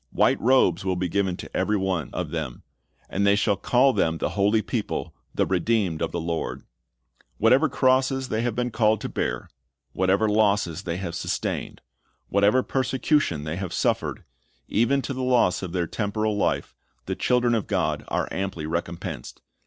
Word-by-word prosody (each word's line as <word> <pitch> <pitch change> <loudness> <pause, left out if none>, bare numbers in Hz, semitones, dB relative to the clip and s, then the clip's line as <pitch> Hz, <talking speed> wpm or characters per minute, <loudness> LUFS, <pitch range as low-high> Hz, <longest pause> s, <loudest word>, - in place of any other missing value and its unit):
White - - +2
robes 110 -8 +3
will 95 -1 0
be 90 0 -1
given 95 0 0
to - - -10
every 105 - +1
one 95 -8 -1
of - - -4
them. 75 -7 -4 0.4
And 100 - -1
"they 100 0 +5
shall 100 0 +2
call 125 +7 +3
them 80 -6 +1
the - - -1
holy 105 +2 +2
people, 105 -8 -3 0.2
the - - +2
redeemed 100 -9 0
of - - -1
the 85 - -2
Lord."^ 85 0 -3 0.7
Whatever 130 +8 +4
crosses 130 0 +2
they 110 - 0
have 120 -2 -1
been 125 0 -1
called 110 -1 +2
to - - -4
bear, - - -2 0.5
whatever 95 +4 +2
losses 100 -6 +2
they 85 0 -2
have 90 -3 -4
sustained, - - -3 0.5
whatever 100 +6 +3
persecution 130 - 0
they 75 +3 -4
have 95 -2 -4
suffered, - - -1 0.4
even 130 +5 +2
to 140 - -3
the 130 - -4
loss 120 -9 +2
of 95 -3 -5
their 90 -1 0
temporal 105 +3 -1
life, 100 - 0 0.3
the - - -2
children 125 -1 +2
of 110 -3 0
God - - 0
are - - -1
amply 95 -5 -3
recompensed. 85 +1 -5
100 Hz, 170 wpm, -25 LUFS, 90-120 Hz, 0.7 s, they